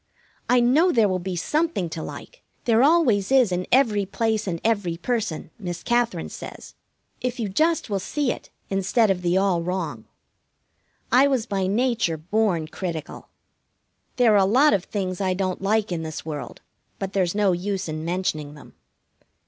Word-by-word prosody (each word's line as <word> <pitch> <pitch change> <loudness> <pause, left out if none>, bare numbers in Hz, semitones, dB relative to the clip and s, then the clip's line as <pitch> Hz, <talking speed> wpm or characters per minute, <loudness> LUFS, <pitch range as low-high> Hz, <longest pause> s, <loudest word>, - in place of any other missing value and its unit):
I 250 0 +5
know 295 +10 +4
there 225 -7 +4
will 185 -1 -1
be 185 +1 -4
something 300 - 0
to 160 - -5
like, - - -9 0.2
there 230 -2 +4
always 265 - +3
is 255 -7 +5
in 180 0 -2
every 230 -6 +4
place 220 +2 -1
and 170 -3 -2
every 200 -7 0
person, 190 -6 -3
Miss 175 -4 -5
Katherine 235 -8 0
says, - - -9 0.5
if 250 0 -3
you 225 - -1
just 315 - +1
will 200 -3 -1
see 280 +6 -1
it - - -8 0.2
instead 195 +3 +2
of 180 -2 -1
the 175 +1 +1
all 190 -3 +2
wrong. 170 -10 -3 1.1
I 260 +4 +6
was 260 -5 0
by 195 -4 -1
nature 220 -5 +1
born 180 -1 0
critical. 165 -3 -6 0.9
There 240 -4 +4
are - - +5
a 195 - +5
lot 260 +9 +4
of 195 -2 0
things 190 -3 -3
I 185 -1 +1
don't 185 -1 -2
like 210 +1 +1
in 170 -2 -2
this 155 -1 -6
world, 150 -3 -6 0.4
but 195 0 -5
there's 185 -2 +1
no 205 -2 +3
use 190 +2 -2
in 155 0 -4
mentioning 160 -4 -2
them. 150 - -15
195 Hz, 175 wpm, -24 LUFS, 180-235 Hz, 1.1 s, I